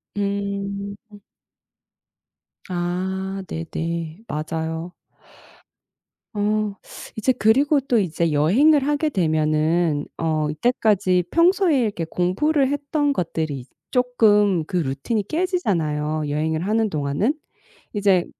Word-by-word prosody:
음. 200 0 -3 1.7
아. 190 +2 -2
네네. 165 +3 -4
맞아요. 160 +2 -4 1.4
어. 210 0 0 0.4
이제 220 +4 +2
그리고 270 +6 +3
또 250 -4 +1
이제 170 -3 0
여행을 265 - +4
하게 295 +1 +1
되면은 155 - +1
어 155 -2 0
이때까지 185 - +2
평소에 340 -3 +3
이렇게 200 -7 -1
공부를 265 - +1
했던 290 0 0
것들이 160 - -2
이제 125 - -17 0.2
쪼끔 210 -7 +3
그 180 - -2
루틴이 165 - -1
깨지잖아요, 165 - -1
여행을 155 +2 -1
하는 220 +1 +1
동안은. 150 - 0 0.6
이제 195 -4 +3
190 Hz, 215 characters per minute, -22 LUFS, 160-230 Hz, 1.7 s, 여행을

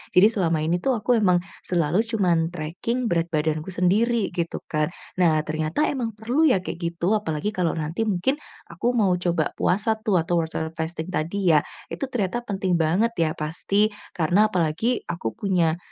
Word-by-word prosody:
Jadi 185 +3 +8
selama 170 -6 +1
ini 175 +2 0
tuh 265 -3 +1
aku 225 +3 +1
emang, 185 -4 +4 0.2
selalu 170 0 +1
cuman 185 -8 +1
tracking 180 +10 -3
berat 170 -1 +1
badanku 155 +1 -1
sendiri, 200 +5 +1
gitu 170 -1 -2
kan. 155 0 0 0.3
Nah, 165 -3 +4
ternyata 155 - 0
emang 230 -6 -2
perlu 255 +9 +2
ya 225 - +4
kayak - - -5
gitu 170 +3 0
apalagi 205 -1 -1
kalau 180 -4 0
nanti 160 +6 -3
mungkin, 205 +6 +1 0.4
aku 235 +9 -1
mau 200 -5 +3
coba 170 -3 0
puasa 210 +5 +1
tuh, 215 -4 +2
atau 170 +1 +1
water 160 0 -4
fasting 160 0 -4
tadi 175 +2 +1
ya, 150 - +7 0.3
itu - - -3
ternyata 235 -1 -1
penting 195 -5 -2
banget 185 +9 +2
ya 165 -1 +3
pasti, 200 +7 0 0.2
karena 180 +6 +3
apalagi 185 +7 0
aku 170 -10 -3
punya, 175 -5 +1
180 Hz, 170 wpm, -24 LUFS, 165-215 Hz, 0.4 s, Jadi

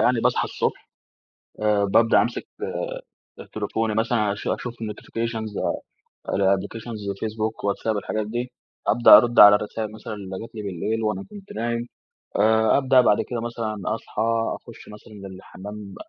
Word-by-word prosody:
يعني، 120 -2 +3
باصحى - - +2
الصبح - - -3 0.7
آآ 105 -1 +3
بابدأ 115 +4 +4
أمسك 120 0 -2 1.0
آآ، - - -8
تليفوني 110 -1 -1
مثلًا 110 -2 +1
أش 100 - -7
أشوف 120 - -2
الnotifications 115 0 -4 0.8
الapplications، 100 +4 -1 0.2
فيسبوك، 110 0 -3
واتساب 105 +2 0
الحاجات 105 +1 -2
دي، 120 +3 -3 0.4
أبدأ 120 +3 +9
أرد 120 0 +3
على 105 0 +10
الرسايل 105 +1 -4
مثلًا 110 0 -7
اللي 95 -2 -7
جات 115 +1 -10
لي 110 - -5
بالليل 105 +4 -2
وأنا 110 - -1
كنت 205 -1 -11
نايم. 115 +1 -2 0.5
آآ، 110 +1 +4
أبدأ 130 -1 +5
بعد 105 -4 +4
كده 120 -2 -3
مثلًا 115 -2 -4 0.2
أصحى، 110 -1 -4 0.3
أخش - - -12
مثلًا 105 -1 -11
للحمّام 100 +2 -10
110 Hz, 140 wpm, -24 LUFS, 105-115 Hz, 1.0 s, على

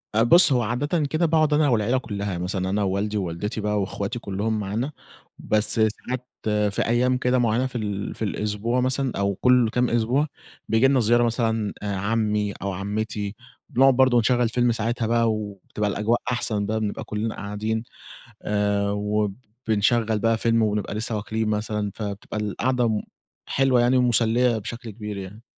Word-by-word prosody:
أ 115 - +4
بُصّ، 170 +4 +9
هو 125 - +2
عادةً 145 +9 -1
كده 155 +4 0
باقعد 155 -2 +2
أنا 150 -1 +3
والعيلة 120 +2 +2
كُلّها 100 -6 -4
مثلًا 95 +1 -2
أنا 100 +1 0
ووالدي 100 +2 -1
ووالدتي 100 +4 -3
بقى 105 -1 0
وأخواتي 100 +4 -3
كُلهم 105 +2 -2
معانا، 110 +8 -3 0.5
بس 105 0 +2
ساعات 125 +3 -1 0.5
في - - +1
أيام 125 +2 +2
كده 125 0 +1
مُعيّنة 120 +2 +1
في 125 - -13
ال 100 -2 -4
في - - -15
الأسبوع 105 +4 -1
مثلًا 130 +1 +1
أو 100 -1 0
كلُ 125 +2 +3
كام 125 +2 +1
أسبوع، 120 +6 +1 0.4
بييجي 110 +4 +4
لنا 135 -1 +3
زيارة 120 +2 +3
مثلًا 115 -3 0
عمي 105 +1 -1
أو 100 0 -2
عمتي، 105 +1 -3 0.3
بنُقعد 135 +1 +5
برضه 130 -2 +4
نشغّل 120 0 +2
فيلم 120 0 +2
ساعتها 115 0 -1
بقى 115 -1 +2
وبتبقى 105 0 -4
الأجواء 110 +4 0
أحسن 110 -4 -1
بقى 110 +2 -1
بنبقى 105 -2 -3
كُلنا 110 +1 -3
قاعدين، 110 +2 -3 0.6
آآ، 100 -1 0
وبنشغّل 105 +2 -1
بقى 115 +1 +2
فيلم 115 0 +2
ونبقى 105 -1 -1
لسه 110 +1 -1
واكلين 110 +1 -2
مثلًا 105 -1 -2
فبتبقى 105 0 -5
القعدة 115 +1 0 0.5
حلوة 130 -2 +2
يعني 125 +2 +3
مُسلية 120 -1 +3
بشكل 115 +2 -7
كبير 105 -1 -7
يعني. 100 +4 -9
110 Hz, 160 wpm, -24 LUFS, 105-120 Hz, 0.6 s, بُصّ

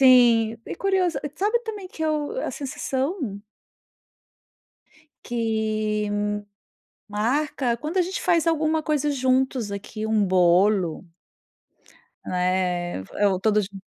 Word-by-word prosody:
Sim, 235 -4 +6
e - - -4
curioso, 380 -3 +1
e 290 - -3
sabe 425 +5 +2
também 420 -4 -5
que 320 - -7
eu 310 +10 -1
a - - -2
sensação 270 - -3 1.8
Que 215 -2 -1
hum, 205 0 0 0.8
marca 240 +3 0
quando 310 +8 -4
a - - +5
gente 370 +3 -3
faz 340 -2 +2
alguma 315 -1 +1
coisa 295 -1 +1
juntos 260 -4 +1
aqui, 215 +2 -5
um 220 -1 +2
bolo. 185 0 +3 1.2
Né, 180 - 0
f 95 - -14 0.2
ou 190 -2 +1
todos 210 -1 +2
jun 195 -1 -11
235 Hz, 120 wpm, -24 LUFS, 205-305 Hz, 1.8 s, Sim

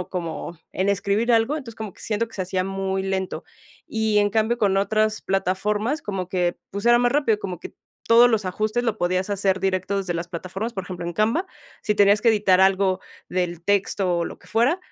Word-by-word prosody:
o 180 - -6
como 170 -1 -5
en 190 +1 0
escribir 200 +4 +1
algo, 230 +4 +3
entonces 240 -7 -8
como 215 -3 -6
que - - -20
siento 225 +1 -1
que 225 - -17
se 190 - -2
hacía 185 0 -1
muy 195 0 -2
lento. 190 -1 -3 0.4
Y 220 -1 +1
en 205 0 +3
cambio 220 +3 +1
con 200 -3 +2
otras 215 +2 +1
plataformas, 210 - -1
como 190 -3 -4
que, 180 -2 0
pues, 200 +4 -4
era 240 0 +6
más 245 +1 +2
rápido, 280 -8 +2
como 185 -4 -6
que - - -9 0.3
todos 235 +1 +7
los 220 -3 +1
ajustes 215 +6 -1
lo 230 - -1
podías 185 +2 0
hacer 195 -1 +1
directo 190 +1 0
desde 190 -3 -1
las 170 0 -4
plataformas, 185 +6 -5
por 190 - -4
ejemplo, 180 -1 -6
en 170 - -4
Canva, 225 - +1 0.3
si 210 - 0
tenías 205 0 +5
que 235 - +3
editar 205 -4 +4
algo 190 -1 +3 0.3
del 175 -2 -2
texto 195 -2 +1
o 170 - 0
lo - - -8
que - - -20
fuera, 240 +10 +2
200 Hz, 215 wpm, -23 LUFS, 185-220 Hz, 0.4 s, todos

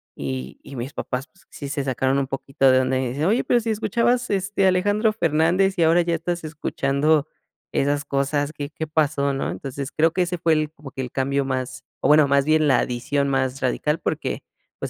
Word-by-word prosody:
Y 65 -1 -5
y 140 - -10
mis 125 +3 -5
papás, 125 +1 -4
pues, 190 - -27
sí 140 - -7
se 140 -1 -2
sacaron 130 +1 0
un 135 - -1
poquito 135 0 +1
de 130 - +5
onda, 130 0 0
y 130 - -1
dicen: 140 +5 -2
"Oye, 215 +7 +2
pero 245 - +3
si 230 -1 -2
escuchabas, 235 +3 +1
este, 195 0 +1
Alejandro 205 +4 +2
Fernández, 175 +2 +2
y - - +5
ahora 165 +2 +5
ya 170 0 -1
estás 170 +1 -3
escuchando 150 -1 0 0.4
esas 145 +1 0
cosas, 145 +1 -1
¿qué 145 -1 -5
qué 160 +1 -5
pasó?", 145 -2 +1
¿no? 135 - -2
Entonces, 140 0 -5
creo 160 +1 +2
que 185 - +1
ese 180 0 -3
fue 165 -1 +2
el 155 -1 0
como 145 -3 -12
que 135 - -5
el 125 -2 -5
cambio 140 +1 0
más 130 -1 -3 0.2
o, - - +1
bueno, 150 -1 +6
más 140 0 +3
bien 155 0 +3
la 130 - +4
adición 140 +3 -1
más 135 -1 0
radical, 150 +4 0
porque, - - -3 0.4
pues, - - -4
145 Hz, 215 wpm, -23 LUFS, 135-170 Hz, 0.4 s, bueno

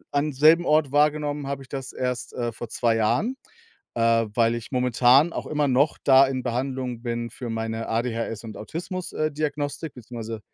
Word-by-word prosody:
am 145 +1 0
selben 155 +5 +5
Ort 150 -3 +3
wahrgenommen 150 -1 +1
habe 140 -1 -4
ich 130 - -16
das 135 -2 -6
erst, 125 -2 -3
äh, 120 -1 -2
vor 115 +1 -7
2 115 -1 +1
Jahren, 205 - +1 0.6
äh, 115 0 +3
weil 115 -1 +3
ich 115 - -8
momentan 125 +5 +4
auch - - -5
immer 150 -1 +1
noch 135 +4 +2
da 135 0 +7
in 130 -1 -3
Behandlung 125 -1 -3
bin 120 -1 -3
für 120 +1 -7
meine 115 0 -3
ADHS 115 -1 -2
und 110 -2 -8
Autismus, 175 - -6
äh, 155 0 -1
Diagnostik, 145 0 -3
beziehungsweise 115 -2 -7
130 Hz, 175 wpm, -25 LUFS, 115-145 Hz, 0.6 s, da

